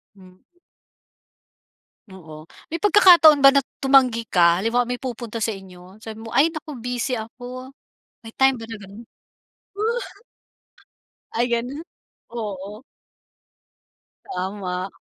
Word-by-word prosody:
Hmm. 185 Hz, -1 st, -18 dB, 1.8 s
Oo. 155 Hz, -4 st, -12 dB, 0.2 s
May 330 Hz, -, -3 dB
pagkakataon 345 Hz, -6 st, +6 dB
ba 275 Hz, -, +9 dB
na 275 Hz, -1 st, +2 dB, 0.2 s
tumanggi 255 Hz, -4 st, +3 dB
ka 170 Hz, 0 st, +3 dB
halimbawa 240 Hz, +3 st, +1 dB
may 245 Hz, +1 st, -5 dB
pupunta 235 Hz, -3 st, -6 dB
sa 220 Hz, -, 0 dB
inyo. 190 Hz, -2 st, -10 dB
Sabi 220 Hz, 0 st, -10 dB
mo, 225 Hz, -, -9 dB
"Ay 295 Hz, +8 st, +2 dB
naku 310 Hz, -2 st, -8 dB
busy 245 Hz, +1 st, -3 dB
ako," 250 Hz, +4 st, -9 dB, 0.5 s
may 225 Hz, -, -10 dB
time 265 Hz, -1 st, +3 dB
ba 225 Hz, -, -8 dB
na 225 Hz, -, -9 dB
gano'n? 200 Hz, +4 st, -12 dB, 2.3 s
Ay 235 Hz, +2 st, +1 dB
gano'n, 250 Hz, +6 st, -2 dB, 0.5 s
oo. 210 Hz, -1 st, -7 dB, 1.5 s
Tama. 185 Hz, 0 st, -4 dB
230 Hz, 110 wpm, -22 LUFS, 195-265 Hz, 2.3 s, ba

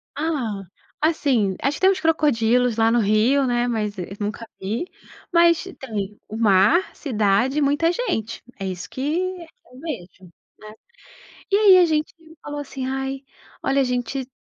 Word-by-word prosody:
Ah, 270 Hz, -10 st, -2 dB, 0.4 s
assim, 265 Hz, -, +1 dB
acho 280 Hz, +2 st, 0 dB
que -, -, -15 dB
temos 380 Hz, 0 st, +4 dB
crocodilos, 250 Hz, -7 st, +2 dB
lá 225 Hz, 0 st, +3 dB
no 240 Hz, -, +3 dB
Rio, 225 Hz, +7 st, +3 dB
né, 245 Hz, 0 st, +1 dB
mas 210 Hz, -3 st, -2 dB
eu 180 Hz, -, -4 dB
nunca 215 Hz, +2 st, -4 dB
vi. 220 Hz, -, -2 dB, 0.5 s
Mas, 340 Hz, 0 st, +4 dB, 0.2 s
tem 210 Hz, -5 st, -5 dB
o 215 Hz, -, -8 dB
mar, 210 Hz, -, +3 dB
cidade 240 Hz, +2 st, +1 dB
e -, -, 0 dB
muita 290 Hz, +4 st, +2 dB
gente. 230 Hz, -, -3 dB, 0.2 s
É 195 Hz, -, -4 dB
isso 180 Hz, -2 st, -5 dB
que 260 Hz, -, -7 dB, 0.7 s
eu 255 Hz, -, -14 dB
vejo, 275 Hz, -, -5 dB, 0.2 s
né? -, -, -15 dB, 1.2 s
E -, -, +4 dB
aí 405 Hz, -3 st, +7 dB
a 355 Hz, -, +6 dB
gente 310 Hz, -1 st, -1 dB, 0.3 s
falou 290 Hz, 0 st, -6 dB
assim: 270 Hz, -2 st, -6 dB
"Ai, 270 Hz, 0 st, -3 dB, 0.4 s
olha, 275 Hz, 0 st, +2 dB
a -, -, +3 dB
gente 250 Hz, +1 st, -2 dB
255 Hz, 160 wpm, -22 LUFS, 215-300 Hz, 1.2 s, aí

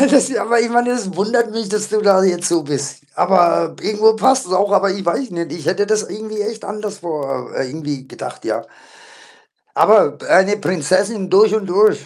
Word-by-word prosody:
Äh, 280 Hz, -, +5 dB
das 265 Hz, -2 st, +3 dB
aber 235 Hz, +1 st, +1 dB
ich 235 Hz, -, 0 dB
meine, 240 Hz, +1 st, +2 dB
das 200 Hz, -7 st, -3 dB
wundert 225 Hz, +4 st, 0 dB
mich, 225 Hz, -2 st, -4 dB
dass 210 Hz, 0 st, -2 dB
du 215 Hz, 0 st, 0 dB
da 195 Hz, -2 st, +5 dB
jetzt 180 Hz, -1 st, +1 dB
so 165 Hz, -2 st, 0 dB
bist. 140 Hz, -1 st, -4 dB
Aber 175 Hz, -3 st, +2 dB
irgendwo 215 Hz, +1 st, +2 dB
passt 260 Hz, +3 st, +2 dB
es 180 Hz, -, -7 dB
auch, 200 Hz, +2 st, +1 dB
aber 200 Hz, 0 st, +3 dB
ich 190 Hz, -1 st, -4 dB
weiß 250 Hz, +9 st, -1 dB
nicht. 170 Hz, -1 st, -5 dB
Ich 160 Hz, -3 st, -8 dB
hätte 190 Hz, +4 st, 0 dB
das 215 Hz, 0 st, +1 dB
irgendwie 215 Hz, 0 st, -7 dB
echt 220 Hz, +1 st, -5 dB
anderswo, 170 Hz, -11 st, -5 dB
äh, 130 Hz, -, -3 dB
irgendwie 145 Hz, -2 st, -6 dB
gedacht, -, -, -9 dB
ja. -, -, -3 dB, 1.1 s
Aber 205 Hz, -9 st, +4 dB
eine 200 Hz, +2 st, +4 dB
Prinzessin 185 Hz, +3 st, -1 dB
durch 210 Hz, +3 st, +5 dB
und 215 Hz, -2 st, -2 dB
durch. 205 Hz, +4 st, +2 dB
200 Hz, 195 wpm, -17 LUFS, 175-215 Hz, 1.1 s, Äh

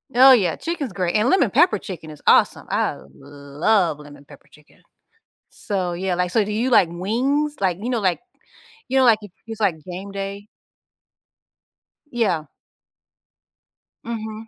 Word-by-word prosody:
Oh 265 Hz, +2 st, +8 dB
yeah, 185 Hz, -10 st, +2 dB
chicken's 300 Hz, -, -5 dB
great, 180 Hz, +1 st, -2 dB
and 215 Hz, +3 st, +2 dB
lemon-pepper 345 Hz, -, +3 dB
chicken 175 Hz, -6 st, -9 dB
is 150 Hz, -, -12 dB
awesome. -, -, +3 dB
I -, -, -1 dB, 0.2 s
love 145 Hz, +5 st, -1 dB
lemon-pepper 145 Hz, -1 st, -15 dB
chicken. 150 Hz, 0 st, -22 dB, 0.7 s
So 185 Hz, -5 st, -4 dB
yeah, 185 Hz, +1 st, -2 dB
like, 180 Hz, 0 st, -1 dB
so 215 Hz, +3 st, +2 dB
do 210 Hz, -, -5 dB
you 235 Hz, +5 st, -1 dB
like 185 Hz, -7 st, +5 dB
wings, 265 Hz, +12 st, -1 dB
like, 185 Hz, -2 st, 0 dB
you 230 Hz, -, -4 dB
know, 240 Hz, -, 0 dB
like, 185 Hz, -4 st, 0 dB, 0.7 s
you 265 Hz, +1 st, +1 dB
know, 260 Hz, -, +4 dB
like, 225 Hz, -3 st, +5 dB
if 205 Hz, -, -11 dB, 0.2 s
it's, 225 Hz, -1 st, -8 dB
like, 200 Hz, -5 st, +2 dB
game 190 Hz, +2 st, -8 dB
day. 200 Hz, +1 st, -6 dB, 1.6 s
Yeah. 190 Hz, -10 st, 0 dB, 1.6 s
Mhm. 220 Hz, -1 st, -6 dB
200 Hz, 145 wpm, -21 LUFS, 175-235 Hz, 1.6 s, Oh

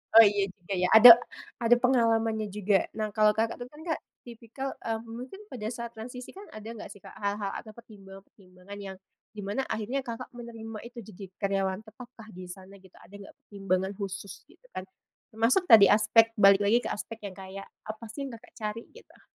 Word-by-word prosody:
Oh 225 Hz, -, +12 dB
iya 200 Hz, -1 st, +1 dB
juga 185 Hz, 0 st, -8 dB
ya, 180 Hz, 0 st, +1 dB
ada 220 Hz, +2 st, +11 dB, 0.5 s
ada 235 Hz, +1 st, +6 dB
pengalamannya 225 Hz, -4 st, +1 dB
juga. 205 Hz, -1 st, +1 dB, 0.2 s
Nah, 215 Hz, -1 st, -3 dB
kalau, 215 Hz, -1 st, +5 dB
Kakak, 225 Hz, +2 st, -1 dB
tuh 245 Hz, 0 st, -8 dB
kan, 300 Hz, -, -15 dB, 0.2 s
Kak, -, -, -9 dB, 0.3 s
tipikal, 240 Hz, +3 st, -7 dB
eee, 225 Hz, -1 st, -2 dB
mungkin 250 Hz, -, -9 dB
pada 220 Hz, -, -6 dB
saat 235 Hz, -1 st, -7 dB
transisi 250 Hz, +7 st, -9 dB
kan 395 Hz, -, -10 dB
ada 215 Hz, 0 st, -10 dB
nggak 220 Hz, -, -9 dB
sih 200 Hz, -, -13 dB
hal-hal 200 Hz, 0 st, -4 dB
atau 215 Hz, -, -8 dB
pertimbangan-pertimbangan 195 Hz, -3 st, -14 dB
yang 195 Hz, -1 st, -8 dB, 0.3 s
di 215 Hz, -, -12 dB
mana 205 Hz, +7 st, -2 dB
akhirnya, 245 Hz, +5 st, -2 dB
Kakak, 235 Hz, -2 st, -6 dB
menerima 225 Hz, -2 st, -8 dB
itu 240 Hz, 0 st, -10 dB
jadi 205 Hz, -2 st, -10 dB
karyawan 195 Hz, -1 st, -1 dB
tetap 240 Hz, +3 st, -13 dB
kah 225 Hz, -3 st, -14 dB
di 185 Hz, -, -9 dB
sana 190 Hz, +2 st, -11 dB
gitu 190 Hz, -2 st, -18 dB
ada 200 Hz, -, -16 dB
nggak 200 Hz, -1 st, -12 dB
pertimbangan 195 Hz, -1 st, -1 dB
khusus 195 Hz, -1 st, -7 dB
gitu -, -, -25 dB
kan 185 Hz, -, -4 dB, 0.5 s
termasuk 230 Hz, +12 st, +2 dB
tadi 225 Hz, -, +8 dB
aspek 225 Hz, +2 st, +4 dB
balik 200 Hz, -1 st, +6 dB
lagi 220 Hz, +4 st, +2 dB
ke -, -, -3 dB
aspek 220 Hz, +1 st, -7 dB
yang 200 Hz, -, -5 dB
kayak 190 Hz, +1 st, -9 dB, 0.2 s
apa 215 Hz, +2 st, -7 dB
sih 275 Hz, +3 st, -5 dB
yang, 240 Hz, -, -8 dB
Kakak, 240 Hz, +2 st, -17 dB
cari, 215 Hz, +2 st, -4 dB
gitu? 475 Hz, -, -18 dB
215 Hz, 190 wpm, -28 LUFS, 195-235 Hz, 0.5 s, Oh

